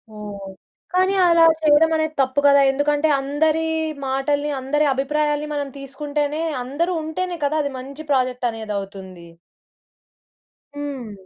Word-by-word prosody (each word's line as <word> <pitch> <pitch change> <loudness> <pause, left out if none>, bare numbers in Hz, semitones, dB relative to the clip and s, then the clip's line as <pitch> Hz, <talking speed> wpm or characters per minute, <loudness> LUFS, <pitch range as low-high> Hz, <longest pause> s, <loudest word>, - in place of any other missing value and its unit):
ఓహ్! 200 -2 -8 0.4
కానీ 375 +2 +2
అలా 335 -1 +6 0.2
చేయడం 310 +1 +5
అనేది 315 0 -1
తప్పు 260 +2 +1
కదా! 280 0 +6
ఎందుకంటే 295 +2 +1
అందరి 310 +3 +1 0.4
మాటల్ని, 285 +2 0
అందరి 295 +3 +1
అభిప్రాయాల్ని, 295 +2 -1
మనం 285 -1 -2
తీసుకుంటేనే 290 +2 -3 0.2
అందరూ 330 +8 -1
ఉంటేనే 350 +3 -3
కదా! 305 +2 0
అది 280 - -3
మంచి 280 +4 -9
ప్రాజెక్ట్ 255 -2 +1
అనేది 220 -2 -6
అవుతుంది. 190 -3 -10 1.5
హ్మ్. 275 -6 -5
285 Hz, 125 wpm, -21 LUFS, 260-305 Hz, 1.5 s, అలా